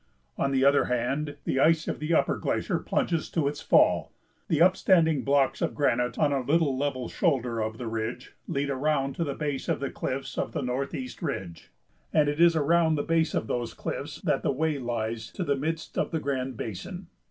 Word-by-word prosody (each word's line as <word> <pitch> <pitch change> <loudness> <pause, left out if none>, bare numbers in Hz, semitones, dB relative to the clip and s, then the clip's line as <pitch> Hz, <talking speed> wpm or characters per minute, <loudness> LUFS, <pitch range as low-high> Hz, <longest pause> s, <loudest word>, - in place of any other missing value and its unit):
On 140 - 0
the 135 0 +3
other 140 0 +5
hand, 135 +5 -1
the 135 - 0
ice 160 +2 +3
of - - -3
the 155 +2 -3
upper 165 - +3
glacier - - -1
plunges 165 -3 -1
to 155 -4 0
its 145 +1 -3
fall. - - +3 0.4
The 155 - +1
upstanding 170 -4 +4
blocks 140 -1 +2
of - - -1
granite 125 -4 +1
on 145 -2 +2
a 135 - +1
little 145 +1 +2
level 130 -2 -2
shoulder 125 - 0
of 110 0 -2
the 125 - -6
ridge 115 +2 -4
lead 140 0 -1
around 140 0 0
to 170 - +1
the 140 -3 -3
base 145 -3 -3
of - - +1
the 140 - -3
cliffs 135 0 -4
of - - -2
the - - -2
Northeast 140 - -4
Ridge, 95 - -5 0.4
and 150 -1 +3
it 145 +3 0
is 170 -1 +6
around 160 +1 +3
the 145 - -1
base 165 -1 +1
of - - 0
those 120 +1 -3
cliffs - - -5
that - - +1
the - - +1
way 150 +1 0
lies 115 -2 -3
to 185 - -3
the 145 -4 +1
midst 160 +4 -3
of - - 0
the 160 - -1
Grand 130 -4 -3
Basin. 175 - -6
140 Hz, 205 wpm, -27 LUFS, 125-160 Hz, 0.4 s, is